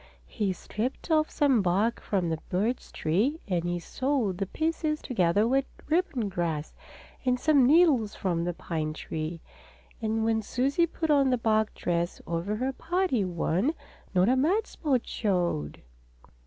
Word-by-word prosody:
He 195 Hz, -, -1 dB
stripped 220 Hz, -, -4 dB
off 310 Hz, -1 st, +3 dB
some 270 Hz, -6 st, +3 dB
bark 195 Hz, +6 st, +1 dB
from 190 Hz, -4 st, -1 dB
the 160 Hz, -1 st, -2 dB
birch 215 Hz, +7 st, -1 dB
tree 215 Hz, -, 0 dB
and 175 Hz, -3 st, 0 dB
he 175 Hz, 0 st, -1 dB
sewed 230 Hz, -, -1 dB
the 195 Hz, -, -1 dB
pieces 315 Hz, -, -1 dB
together 205 Hz, -2 st, +2 dB
with 270 Hz, +2 st, +2 dB, 0.2 s
ribbon 305 Hz, -, +1 dB
grass, 165 Hz, -5 st, -2 dB, 0.5 s
and 250 Hz, -1 st, +1 dB
some 280 Hz, -3 st, +4 dB
needles 285 Hz, -9 st, +4 dB
from 170 Hz, -3 st, -1 dB
the 175 Hz, 0 st, -1 dB
pine 155 Hz, -3 st, -3 dB
tree. 160 Hz, +1 st, -5 dB, 0.6 s
And 220 Hz, 0 st, 0 dB
when 225 Hz, 0 st, +2 dB
Susie 275 Hz, +10 st, +1 dB
put 320 Hz, -1 st, -2 dB
on 280 Hz, -2 st, +4 dB
the 250 Hz, -, +2 dB
bark 220 Hz, -2 st, +1 dB
dress 175 Hz, 0 st, -1 dB
over 170 Hz, +5 st, -2 dB
her 260 Hz, +4 st, -1 dB
party 345 Hz, -, 0 dB
one, 185 Hz, -, 0 dB, 0.4 s
not 180 Hz, +1 st, +4 dB
a 255 Hz, -, +4 dB
mud 360 Hz, +12 st, +2 dB
spot 270 Hz, -7 st, -1 dB
showed! 175 Hz, -, -1 dB
220 Hz, 155 wpm, -28 LUFS, 175-275 Hz, 0.6 s, some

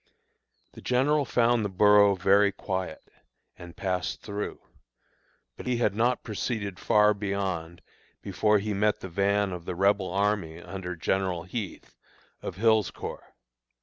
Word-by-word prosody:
The -, -, -13 dB
general 140 Hz, +4 st, +2 dB
found 120 Hz, -2 st, +2 dB
the 105 Hz, -, -1 dB
borough 100 Hz, +1 st, +5 dB
very 100 Hz, +2 st, +4 dB
quiet, 95 Hz, -4 st, -4 dB, 0.5 s
and 85 Hz, -1 st, -12 dB
passed 90 Hz, -2 st, -2 dB
through; 100 Hz, 0 st, -5 dB, 1.0 s
but -, -, -9 dB
he 125 Hz, -1 st, +1 dB
had 110 Hz, -4 st, +1 dB
not 120 Hz, +4 st, +1 dB
proceeded 105 Hz, -3 st, -4 dB
far 105 Hz, +1 st, +4 dB
beyond 95 Hz, -5 st, -3 dB, 0.4 s
before 105 Hz, -1 st, +2 dB
he 105 Hz, +1 st, -2 dB
met 105 Hz, +1 st, +1 dB
the 95 Hz, -, -6 dB
van 100 Hz, +2 st, +1 dB
of 90 Hz, -2 st, -7 dB
the 90 Hz, -, -4 dB
Rebel 100 Hz, 0 st, +2 dB
army 100 Hz, -4 st, 0 dB
under 90 Hz, 0 st, -6 dB
General 90 Hz, +1 st, -1 dB
Heth, 95 Hz, 0 st, -7 dB, 0.5 s
of -, -, -6 dB
Hill's 110 Hz, 0 st, +3 dB
Corps. -, -, -9 dB
100 Hz, 140 wpm, -27 LUFS, 95-105 Hz, 1.0 s, borough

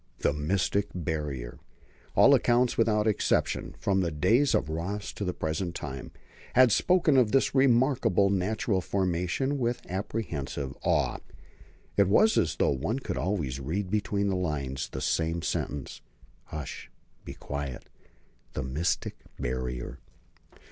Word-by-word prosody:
The -, -, +2 dB
mystic 90 Hz, +6 st, 0 dB
Barrier! 75 Hz, -8 st, -4 dB, 0.6 s
All -, -, +7 dB
accounts 120 Hz, 0 st, +3 dB
without 105 Hz, -2 st, +2 dB
exception, 110 Hz, -3 st, 0 dB
from 95 Hz, -1 st, +1 dB
the 85 Hz, -, 0 dB
days 115 Hz, -, +3 dB
of 65 Hz, -, +1 dB
Ross 95 Hz, +6 st, -4 dB
to -, -, -5 dB
the 90 Hz, -, 0 dB
present 85 Hz, +1 st, -3 dB
time, 65 Hz, -2 st, -6 dB, 0.5 s
had 130 Hz, -2 st, +7 dB
spoken 170 Hz, -, +3 dB
of 120 Hz, -5 st, +4 dB
this 135 Hz, -, +2 dB
remarkable 125 Hz, -7 st, +3 dB
natural 100 Hz, +2 st, 0 dB
formation 95 Hz, +10 st, -1 dB
with 120 Hz, -1 st, -1 dB
apprehensive 80 Hz, -, -4 dB
awe. -, -, +1 dB, 0.8 s
It 100 Hz, -1 st, +5 dB
was 215 Hz, -, +5 dB
as 80 Hz, -, +2 dB
though -, -, +2 dB
one 80 Hz, -, -1 dB
could 135 Hz, -, -4 dB
always 80 Hz, -9 st, -1 dB
read 90 Hz, +8 st, -3 dB
between 100 Hz, -1 st, 0 dB
the 95 Hz, -, +1 dB
lines 70 Hz, -7 st, -2 dB
the -, -, -6 dB
same 80 Hz, +1 st, 0 dB
sentence: 70 Hz, -3 st, -3 dB, 0.4 s
"Hush, 75 Hz, -2 st, -7 dB, 0.3 s
be -, -, -8 dB
quiet! 70 Hz, -3 st, -5 dB, 0.7 s
the 65 Hz, -, -3 dB
mystic 70 Hz, +7 st, -1 dB, 0.2 s
Barrier!" 60 Hz, 0 st, -4 dB
90 Hz, 135 wpm, -28 LUFS, 75-110 Hz, 0.8 s, All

